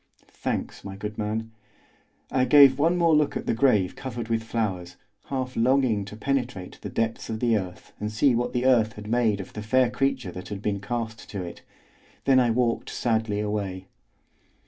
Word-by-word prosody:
"Thanks, - - -4
my 95 -1 -7
good 105 +2 -6
man." 110 +1 -2 0.8
I 130 - +2
gave 140 0 +7
one 165 +4 +3
more 170 -2 +4
look 150 -1 +2
at - - -6
the - - +1
grave 110 -6 +2
covered 120 -4 -6
with 115 -1 +1
flowers, 95 -6 -3 0.3
half 130 -2 -3
longing 120 -4 +2
to 105 - -9
penetrate 125 -6 -3
the - - -5
depths 115 0 -2
of 110 -1 -3
the 115 -1 +2
earth 95 -3 -5
and 105 0 -3
see 125 +5 +3
what 120 +1 0
the 125 0 -1
earth 115 -4 +4
had 105 - -10
made 110 -3 +2
of 95 - -8
the 105 - -5
fair 125 +3 +2
creature 130 -5 -1
that 90 +1 -8
had 105 -2 -5
been 100 -1 -1
cast 115 +1 -4
to 100 -3 -4
it; 85 -1 -8 0.6
then 135 -1 +5
I 125 -2 +3
walked 120 0 0
sadly 110 -3 0
away. 100 -3 -3
115 Hz, 190 wpm, -26 LUFS, 105-125 Hz, 0.8 s, gave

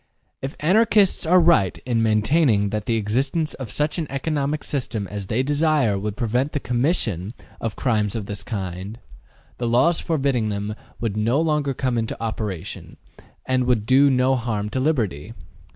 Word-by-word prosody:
If 135 +1 -5
Anarchists 195 +1 +3
are 180 +2 +6
right 160 - +3
in 120 -2 +1
maintaining 110 -1 +2
that 105 -1 -3
the 115 - +1
existence 135 +9 0
of 130 -5 -7
such 150 - -1
an 160 - -2
economic 145 +1 -2
system 120 -7 -3
as 100 -2 -5
they 120 +6 0
desire 145 -7 +2
would 105 +1 -4
prevent 125 +5 0
the 145 - 0
commission 120 - -1 0.2
of 115 -2 -3
crimes 110 -5 0
of 110 -3 -3
this 100 0 -6
kind, 95 0 -5 0.6
the 120 - -1
laws 130 +9 +3
forbidding 135 -8 0
them 105 +1 -3 0.3
would 110 -4 -2
no 115 +6 +1
longer 150 -4 0
come 125 -2 0
into 115 -1 -3
operation, 110 -6 -5 0.5
and 130 -1 +1
would 115 -4 +1
do 135 +4 +5
no 130 0 +3
harm 110 -4 -2
to 130 - -1
liberty. 115 - -1
120 Hz, 165 wpm, -23 LUFS, 105-145 Hz, 0.6 s, are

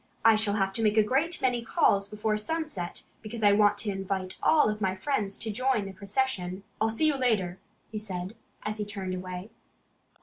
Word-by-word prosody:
I 225 -1 +8
shall 215 -1 +1
have 195 -2 +1
to 225 - -1
make 215 0 +2
a 215 - +7
great 290 +10 +1
many 250 -2 +2
calls 200 -3 +3
before 215 +1 -1
sunset, 215 - -3 0.2
because 225 0 -6
I 205 - +7
want 205 0 +4
to 210 - -2
invite 190 -1 -3
all 295 -9 +4
my 190 -2 0
friends 200 -2 -1
to 220 - -3
join 250 -1 +1
the 195 - -7
procession.... 195 -2 -2 0.2
I'll 220 - +3
see 225 +8 +1
you 300 -3 +3
later," 205 -8 +1 0.3
he 215 - -3
said, 190 -1 -5 0.3
as 215 0 -3
he 210 - -1
turned 195 -3 -4
away. 185 +2 -6
210 Hz, 195 wpm, -28 LUFS, 195-225 Hz, 0.3 s, I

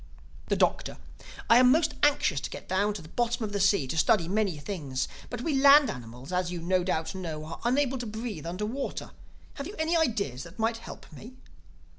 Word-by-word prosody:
The - - +1
Doctor: - - 0 0.5
"I 230 - +7
am 250 0 +6
most 310 +1 +3
anxious 285 - +3
to - - -4
get - - -9
down 200 +3 +1
to 185 - -7
the 155 - -13
bottom 240 +3 -1
of 205 - -5
the 200 - -1
sea—to 195 -8 +2
study 170 +1 +3
many 200 -3 0
things. 145 -5 -3 0.2
But 245 - -5
we 315 +3 -1
land 280 -2 +7
animals, 125 +3 -9
as 180 -1 0
you 175 - -4
no 180 +2 +1
doubt 165 -2 -1
know, 160 -5 -5
are 160 - -8
unable 265 +1 +1
to 240 - -4
breathe 215 -7 -5
under 185 +5 -3
water. 265 +6 -4 0.5
Have 280 0 -5
you 410 - -8
any 315 +2 +1
ideas 215 - 0
that 170 +5 -11
might 225 0 0
help 230 - -10
me?" 230 - -11
205 Hz, 205 wpm, -28 LUFS, 165-245 Hz, 0.5 s, I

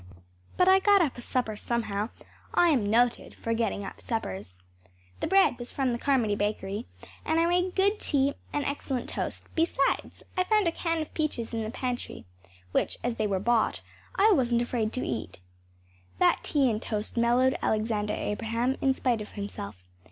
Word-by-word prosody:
But 365 - +4
I 380 0 +7
got 400 -1 +5
up 290 - -1
a 240 - -8
supper 240 -3 -1
somehow. 215 -1 -2 0.5
I 350 - +5
am 240 -10 +2
noted 235 +2 +2
for 230 - -2
getting 225 -3 -1
up - - -9
suppers. 95 - -4 0.6
The - - -1
bread 385 -8 +4
was 240 - -6
from 265 -2 0
the 235 - -2
Carmody 250 -7 +2
bakery 205 +1 -2 0.4
and 320 +1 +1
I 335 - +4
made 360 +1 +1
good 400 +2 +2
tea 280 -1 +1 0.2
and 290 - -1
excellent 270 -3 -3
toast; - - -3
besides, 320 -4 0
I 365 - +3
found 420 -1 +2
a - - +3
can 330 -1 -1
of - - -14
peaches 260 -8 -2
in 225 - -1
the 215 - -3
pantry 250 +1 -4 0.5
which, - - 0
as 240 -1 -1
they 215 - +1
were 195 -2 0
bought, 230 +2 +1 0.3
I 425 +3 +5
wasn’t 240 - +3
afraid 230 -3 -1
to 255 - -2
eat. 115 -3 -4 0.8
That - - +3
tea 280 -3 +2
and 220 -2 0
toast 210 -1 -4
mellowed 245 +3 +3
Alexander 215 -1 0
Abraham 230 +5 -1
in 265 -1 +3
spite 240 -5 0
of 210 - -9
himself. 105 - -6
240 Hz, 180 wpm, -28 LUFS, 215-290 Hz, 0.8 s, I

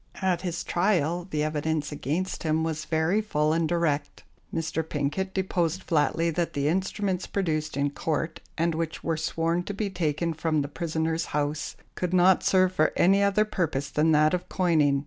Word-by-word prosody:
At 185 -2 +1
his 175 -2 -3
trial 175 -2 +1
the 150 -3 0
evidence 155 0 -1
against 155 +6 -2
him 160 0 +1
was 155 -1 -2
very 160 +7 +1
full 155 -7 +1
and 165 -1 +1
direct. 155 -4 -1 0.3
Mr. 160 0 -1
Pinket 160 +5 -2
deposed 185 -2 0
flatly 165 +1 +1
that 170 +1 -1
the 140 0 0
instruments 190 +2 -1
produced 155 -6 -1
in 140 0 +1
Court, 160 +2 -2 0.2
and 165 +1 +1
which 160 0 -3
were 165 - 0
sworn 165 +2 0
to 205 - -4
be 205 -1 -2
taken 165 -1 -1
from 155 -1 0
the - - -4
prisoner's 160 +1 -2
house, 150 +1 -2 0.2
could 180 0 -1
not 185 +1 +5
serve 185 -1 +3
for 155 -3 +3
any 195 +3 +5
other 200 +1 +3
purpose 150 -9 -2
than 155 +3 +3
that 155 +1 +4
of 180 - -2
coining. 155 -6 +2
165 Hz, 175 wpm, -27 LUFS, 155-180 Hz, 0.3 s, not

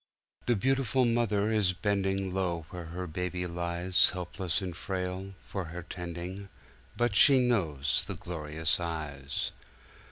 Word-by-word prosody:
"The 120 - +4
beautiful 130 +3 +2
Mother 110 -3 +2
is 105 -4 +3
bending 95 0 0
Low 90 -4 -1
where 90 -2 -6
her 90 +2 -5
Baby 90 +2 -2
liesHelpless 90 +1 +1
and 90 -4 -4
frail, 95 +1 -4
for 95 -3 -4
her 85 +2 -6
tending; 90 +3 -6 0.5
But 120 -3 +2
she 140 +3 +8
knows 85 - +2
the - - -2
glorious 80 -1 -1
eyes." 75 -5 -3
90 Hz, 125 wpm, -30 LUFS, 85-100 Hz, 0.5 s, she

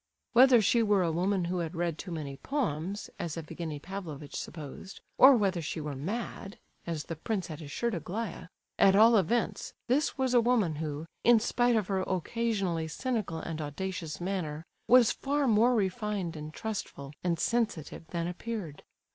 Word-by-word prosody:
Whether 245 -2 +7
she 230 +4 +4
were 205 -4 +3
a 170 - +1
woman 180 +2 +1
who 180 +1 -1
had 170 0 -3
read 170 -2 -1
too 195 - -6
many 150 -5 -5
poems, 200 - -2
as 170 -2 -3
Evgenie 160 -1 -5
Pavlovitch 155 -4 -7
supposed, 155 +4 -7 0.2
or 265 +1 +9
whether 195 -5 +1
she 160 +1 -4
were 150 -2 -4
mad, 195 - -5 0.3
as 160 -3 -2
the 165 - -6
prince 190 +3 -2
had 160 -2 -7
assured 225 +10 -2
Aglaya, 180 +3 -4 0.3
at 195 0 +6
all 225 +3 +7
events, 220 +4 0
this 280 +5 +1
was 260 -2 +1
a 240 - +6
woman 220 -10 +2
who, 150 0 -4 0.2
in 235 -1 +6
spite 240 +2 +2
of 215 -3 +2
her 195 0 -1
occasionally 185 -3 -1
cynical 210 - -2
and 160 -1 -5
audacious 160 +1 -4
manner, 170 -4 -3 0.2
was 245 -2 +7
far 285 +1 0
more 235 +2 +4
refined 200 -4 -1
and 150 0 -7
trustful 155 -8 -5
and 175 -2 +1
sensitive 195 -7 -1
than 170 0 -3
appeared. 180 -3 -5
185 Hz, 165 wpm, -30 LUFS, 160-225 Hz, 0.3 s, or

